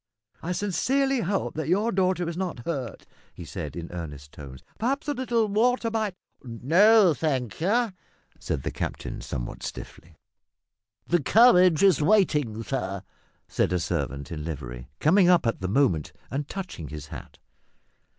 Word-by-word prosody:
"I 170 - -3
sincerely 265 +8 +1
hope 195 -2 -1
that 155 -2 -4
your 205 +7 +2
daughter 185 -2 +1
is 170 - -4
not 175 -10 -4
hurt," 135 - -4 0.3
he - - -9
said, - - -6
in 85 -1 -6
earnest 75 -4 -7
tones. 65 -3 -11 0.2
"Perhaps 270 +7 -1
a 290 - +1
little 240 -4 0
water 230 +3 +1
might 215 -4 -1
" - - -48 0.3
"No, 205 -1 +7
thank 135 -6 -2
you," 220 +4 +1 0.5
said 65 - -3
the - - -2
captain - - -5
somewhat - - -5
stiffly. 80 -1 -8 0.9
"The 175 -1 +2
carriage 185 - +5
is 190 -7 +5
waiting, 150 - +2
sir," 110 -7 -3 0.4
said - - 0
a 90 - +1
servant 70 -3 -3
in 75 -2 -5
livery, 60 -6 -6
coming 180 +4 +5
up 175 -6 +4
at 115 - -1
the 95 - -1
moment 100 - +1 0.2
and 140 +2 -3
touching 185 - -6
his 75 -1 -7
hat. - - -10
170 Hz, 155 wpm, -26 LUFS, -, 0.9 s, No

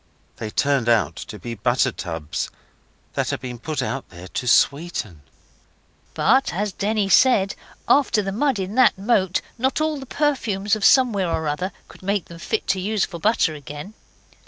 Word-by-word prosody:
They 110 - -5
turned 135 0 +1
out 95 -9 +2
to 105 - -7
be 115 +5 -6
butter 120 +4 +1
tubs 80 -7 -4 0.6
that - - -1
had - - -2
been 125 -2 -7
put 155 +4 -3
out 135 - -4
there 90 0 -11
'to 125 - -4
sweeten'. 140 - +1 0.9
But 270 +1 +3
as 205 +2 -2
Denny 210 +1 0
said, 195 -2 +4 0.3
'After 245 -7 +3
the 195 - -2
mud 265 +4 +1
in 190 +1 -4
that 250 -4 +4
moat 190 -3 +1 0.2
not 265 +4 +1
all 310 -1 0
the 270 - -9
perfumes 220 -10 0
of 215 - -5
somewhere 220 -9 +4
or 160 -1 -1
other 180 +6 -2 0.2
could - - -16
make 200 0 -1
them 170 0 -12
fit - - -2
to 190 - +2
use 205 +2 0
for 170 -3 -8
butter 205 -4 +2
again. 150 +6 -8
190 Hz, 175 wpm, -22 LUFS, 130-215 Hz, 0.9 s, said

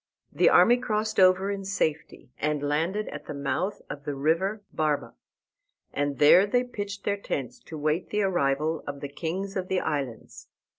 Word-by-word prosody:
The - - +4
army 240 +1 +6
crossed 220 -4 -1
over 185 +1 +5
in 200 -1 -4
safety, 160 -9 -3
and 150 -1 -1
landed 170 +8 0
at - - -8
the - - -5
mouth 145 +8 -2
of 145 - -7
the 145 0 -4
river 175 +9 0
Barba. 155 -2 -1 0.8
And 145 0 -1
there 180 +7 +7
they 245 +4 +2
pitched 205 -5 -6
their 205 0 0
tents 135 - -4
to 160 - -8
wait 155 +4 -1
the 210 0 0
arrival 155 -3 0
of 140 -1 -5
the 145 - -5
kings 180 +7 -4
of 185 -1 -2
the 190 0 +1
islands. 140 -9 -4
170 Hz, 170 wpm, -27 LUFS, 145-200 Hz, 0.8 s, there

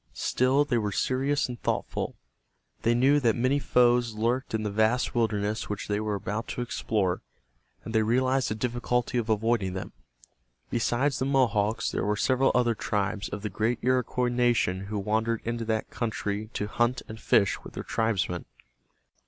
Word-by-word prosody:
Still 130 +3 +2
they 125 -5 +1
were 105 -2 -1
serious 135 +7 0
and 120 -2 -7
thoughtful. - - -2 0.7
They 115 +1 +2
knew 135 +4 +4
that 115 -5 +2
many 130 +4 +2
foes 120 -3 +3
lurked 120 +3 0
in 110 - -1
the 105 - -2
vast 110 +4 +1
wilderness 110 -2 0
which 105 -1 -4
they 105 0 0
were 105 -1 -1
about 105 +3 -4
to - - -4
explore, 105 -6 -1 0.6
and 110 - -6
they 110 - +4
realized 130 +4 +2
the 110 - -2
difficulty 120 +1 -1
of 115 -1 -4
avoiding 110 -3 +1
them. 95 - -5 0.8
Besides 120 +4 +1
the 130 - 0
Mohawks 115 -6 +1
there - - -1
were 105 +1 0
several 130 +4 +3
other 120 -1 +3
tribes 105 -2 -2
of 105 0 -6
the 105 - -2
great 110 +4 0
Iroquois 125 0 +1
nation 120 -6 +1
who 105 +1 -3
wandered 110 +3 0
into 115 0 -2
that 110 -1 -2
country 110 -2 -3
to 105 - -2
hunt 120 +4 0
and 110 0 -8
fish 100 -4 +2
with - - -11
their - - -5
tribesmen. 100 -6 -1
115 Hz, 170 wpm, -27 LUFS, 105-125 Hz, 0.8 s, knew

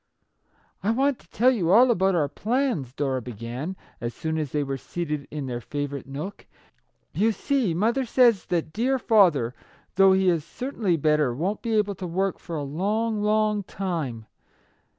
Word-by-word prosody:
" - - -44 0.3
I 205 - +1
want 270 +3 +2
to - - -23
tell 250 +3 +4
you 190 -10 0
all 240 +6 +6
about 190 -3 +2
our 150 -4 +2
plans/' 220 - -1
Dora 135 -3 -1
began, 120 - -6 0.3
as 120 -1 -4
soon 160 -1 -2
as 150 -4 -3
they 150 -1 0
were 135 -1 -3
seated 150 0 -4
in 150 -2 -5
their 120 -2 -4
favourite 145 0 -4
nook. 150 +9 -7 0.3
" - - -46 0.3
You 220 +3 +2
see, 240 - 0
mother 230 +8 +1
says 235 -4 +3
that 165 -3 -1
dear 255 +5 +1
father, 175 - +3 0.4
though 195 0 +7
he 190 0 +2
is 170 -4 +2
certainly 210 - -2
better, 150 -4 +2
won't 185 +9 -2
be 230 -2 -1
able 205 -1 +2
to 185 -1 -6
work 190 +3 -1
for 170 - -7
a 150 - -2
long, 210 +9 -1
long 210 0 +2
time. 165 - -4
180 Hz, 180 wpm, -25 LUFS, 145-215 Hz, 0.4 s, though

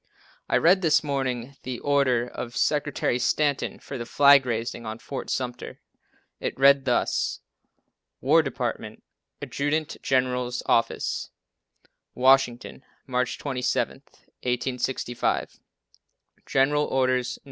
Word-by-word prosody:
I - - +3
read 185 +3 +4
this 160 -3 +3
morning 135 -2 -3
the 125 -1 -5
order 140 -4 +2
of 120 0 -7
Secretary 145 -4 0
Stanton 145 +3 0
for 135 - -8
the 120 - -4
flag 140 -1 +6
raising 115 0 -3
on 110 0 -5
Fort 135 +3 -7
Sumter. 125 -1 -4 0.6
It - - -4
reads 140 0 +5
thus: 125 -2 0 0.8
"War - - +4
department, - - -4 0.4
Adjutant 150 +2 -2
General's 125 -1 0
office, 115 0 0 0.9
Washington, 130 0 +2 0.2
March 125 -2 -1
27th, 130 -4 -3 0.2
1865, 125 0 -2 0.9
General 145 +2 +2
Orders 130 -1 0
No. - - -24
130 Hz, 105 wpm, -25 LUFS, 125-140 Hz, 0.9 s, flag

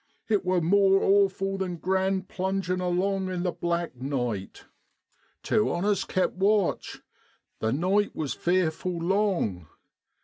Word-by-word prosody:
It 210 -3 +1
wor 185 -1 +1
more 195 +3 +4
awful 195 -1 +2
than 185 -2 -2
grand 190 +1 0
plungin' 185 -1 -2
along 185 +2 0
in 180 -1 -3
the 180 - 0
black 170 -3 -2
night. 125 -6 -4 0.8
Two 215 -1 +2
on 175 +3 -1
us 205 -1 +1
kept 185 - 0
watch: 200 0 0 0.6
the 110 - 0
night 190 - +1
was 150 -3 -2
fearful 180 0 0
long. 170 - 0
185 Hz, 130 wpm, -27 LUFS, 170-195 Hz, 0.8 s, more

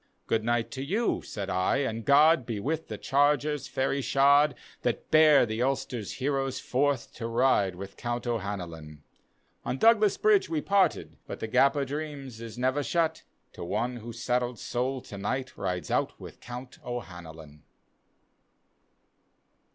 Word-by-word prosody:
" - - -45
Good 110 -1 0
night 120 0 0
to 135 - -5
you," 210 +11 0
said 100 -3 -6
I, 95 +7 +1
" 140 - 0
and 115 -1 -4
God 150 +2 +5
Be 115 -3 -4
with 160 +8 -2
the - - -6
chargcra, 145 +2 +2
faiiy 135 +1 -2
shod, 140 +1 +4 0.3
That 120 - -2
bear 155 -4 +7
the 110 +1 -3
Ulster's 125 -4 -2
heroes 135 -1 -1
forth 135 -1 0
To 115 - -4
ride 115 -6 +2
with 95 +1 -9
Count 120 0 -3
O'Hanlon." 90 -9 -5 0.6
On 130 - -2
Douglas 215 +1 +4
Bridge 420 -2 +3
we 160 - 0
parted, 195 +4 +1
but - - -6
The - - -3
Gap 130 +5 +3
o' 140 -1 0
Dreams 140 -4 -6
is 115 0 -8
never 130 +3 +1
shut, 160 +2 0 0.3
To - - -8
one 115 +8 -2
whose 115 0 -9
saddled 125 -1 0
soul 125 +3 -2
to 100 - -9
night 130 +6 -3
Rides 90 -2 -3
out - - 0
with - - -11
Count 125 +1 -9
O'Hanlon. 80 -10 -8
125 Hz, 160 wpm, -28 LUFS, 110-145 Hz, 0.6 s, bear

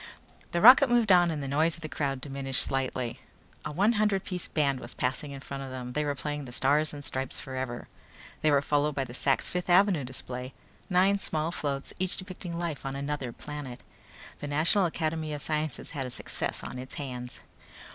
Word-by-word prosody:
The 170 - 0
rocket 255 +5 +10
moved 240 -4 +4
on 175 -1 +6
and 150 -3 -2
the - - -3
noise 155 +4 +2
of 165 - -14
the 155 - -4
crowd 140 -3 -2
diminished 135 -2 -1
slightly. 130 -3 -2 0.4
A 150 - -4
one 195 +9 +3
hundred 210 -3 +2
piece 180 -2 -4
brass - - -26
band 140 -3 +2
was 120 - -8
passing 130 +3 -1
in 140 -1 -7
front 140 -1 -6
of 135 - -6
them. 125 -1 -6
They 150 - +1
were 145 -1 -1
playing 145 +1 -4
"The 125 - -9
Stars 145 +5 +2
and 145 -1 -6
Stripes 130 0 -2
Forever." 130 -2 -4 0.5
They 155 - +4
were 140 -1 +4
followed 145 0 +1
by 135 - 0
the 120 -2 -8
Sak's 135 +1 +1
Fifth 180 0 -2
Avenue 180 -4 +5
display; 125 0 -6 0.3
nine 190 +2 +4
small 160 -2 -1
floats, 140 -4 -3
each 185 0 -1
depicting 185 -2 -6
life 170 -4 -3
on 135 0 -3
another 140 -2 -3
planet. 140 -3 -7 0.6
The 145 - -5
National 160 +7 +3
Academy 160 -1 -2
of 145 - -4
Sciences 155 -3 -2
had 135 -4 -3
a - - -6
success 125 - -3
on 125 - -5
its 130 +1 -6
hands. 125 -3 -6
145 Hz, 205 wpm, -29 LUFS, 135-170 Hz, 0.6 s, rocket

